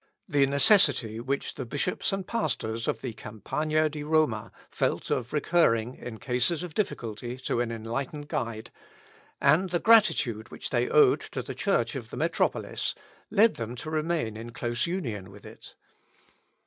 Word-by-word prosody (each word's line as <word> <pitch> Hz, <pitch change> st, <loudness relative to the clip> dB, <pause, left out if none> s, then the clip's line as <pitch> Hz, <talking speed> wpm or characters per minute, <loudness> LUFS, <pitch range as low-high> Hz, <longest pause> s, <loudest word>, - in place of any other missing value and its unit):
The 140 Hz, -1 st, +3 dB
necessity 140 Hz, -, +4 dB
which 135 Hz, +4 st, -2 dB
the 135 Hz, -, -5 dB
bishops 145 Hz, +8 st, -1 dB
and 195 Hz, -1 st, -2 dB
pastors 115 Hz, -, -2 dB
of -, -, -1 dB
the 125 Hz, -4 st, -4 dB
Campagna 155 Hz, +9 st, -1 dB
di 150 Hz, 0 st, -6 dB
Roma 145 Hz, -8 st, +1 dB, 0.2 s
felt -, -, -1 dB
of 120 Hz, -1 st, -1 dB
recurring 130 Hz, -7 st, +2 dB
in 120 Hz, -3 st, -8 dB
cases 130 Hz, +9 st, 0 dB
of 175 Hz, -3 st, -7 dB
difficulty 120 Hz, -, -3 dB
to 120 Hz, -, 0 dB
an 120 Hz, -1 st, -2 dB
enlightened 120 Hz, +6 st, -4 dB
guide, 115 Hz, -4 st, -4 dB, 0.7 s
and 160 Hz, +7 st, +4 dB
the 175 Hz, -, +1 dB
gratitude 170 Hz, -, +4 dB
which -, -, -6 dB
they -, -, +1 dB
owed 440 Hz, -4 st, +5 dB
to -, -, -6 dB
the -, -, -6 dB
Church -, -, 0 dB
of -, -, -6 dB
the -, -, -7 dB
metropolis, -, -, 0 dB, 0.3 s
led 220 Hz, +3 st, +4 dB
them 115 Hz, +1 st, -4 dB
to 155 Hz, +6 st, -6 dB
remain 155 Hz, -8 st, -1 dB
in 115 Hz, +2 st, -8 dB
close 120 Hz, +3 st, -2 dB
union 115 Hz, -, -4 dB
with 100 Hz, +1 st, -14 dB
it. -, -, -13 dB
135 Hz, 160 wpm, -28 LUFS, 115-160 Hz, 0.7 s, owed